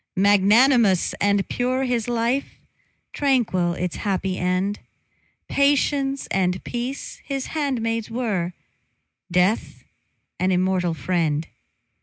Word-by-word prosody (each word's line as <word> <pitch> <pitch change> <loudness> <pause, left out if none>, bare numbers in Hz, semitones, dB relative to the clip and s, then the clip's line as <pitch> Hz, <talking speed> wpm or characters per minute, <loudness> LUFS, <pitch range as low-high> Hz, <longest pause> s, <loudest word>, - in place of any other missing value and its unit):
Magnanimous 205 +1 +4
and 200 -1 +2
pure 255 +2 -1
his 245 -3 -1
life, 240 +3 -1 0.6
Tranquil 230 -11 +1
its 180 0 -3
happy 190 -2 -1
end; 185 +3 0 0.7
Patience 280 -1 +1
and 185 -1 0
peace 245 +3 -5
his 275 -2 -3
handmaids 230 -7 -1
were, 210 -7 -2 0.8
Death 180 +5 +1 0.6
an 185 +1 +1
immortal 180 -2 +1
friend. 160 -1 -1
205 Hz, 95 wpm, -23 LUFS, 185-255 Hz, 0.8 s, Magnanimous